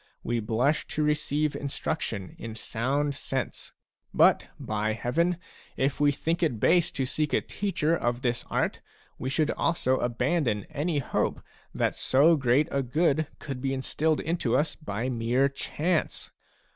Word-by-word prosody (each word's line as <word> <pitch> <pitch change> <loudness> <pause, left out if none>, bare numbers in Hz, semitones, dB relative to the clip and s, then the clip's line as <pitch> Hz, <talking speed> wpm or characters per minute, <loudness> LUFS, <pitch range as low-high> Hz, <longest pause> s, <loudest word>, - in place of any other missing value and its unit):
We 120 0 0
blush 120 +7 +1
to 155 - -1
receive 150 0 +1
in 140 - -3
struction 115 - -3
in 115 -1 -6
sound 135 +6 -1
sense; 135 -2 -4 0.4
but, - - +4
by 110 0 -1
Heaven, 165 +10 0 0.4
if 135 +1 0
we 145 -1 +5
think 165 +5 -1
it 150 -10 +1
base 170 +6 +4
to 135 - -1
seek 150 +3 -1
a - - +3
teacher 170 -5 0
of 120 -4 -1
this 120 -1 0
art, - - 0 0.4
we 130 - -2
should 150 +2 +1
also 130 -6 +1
abandon 120 - 0
any 155 +2 -1
hope 140 - 0 0.4
that - - +1
so 150 +6 +4
great 135 +1 +3
a 140 - +1
good 150 +3 +1
could 135 -4 -6
be 135 0 0
instilled 155 +4 0
into 155 -7 0
us 150 +2 +1
by 115 -5 -4
mere 125 +2 +2
chance. 155 +4 -2
140 Hz, 155 wpm, -27 LUFS, 120-155 Hz, 0.4 s, we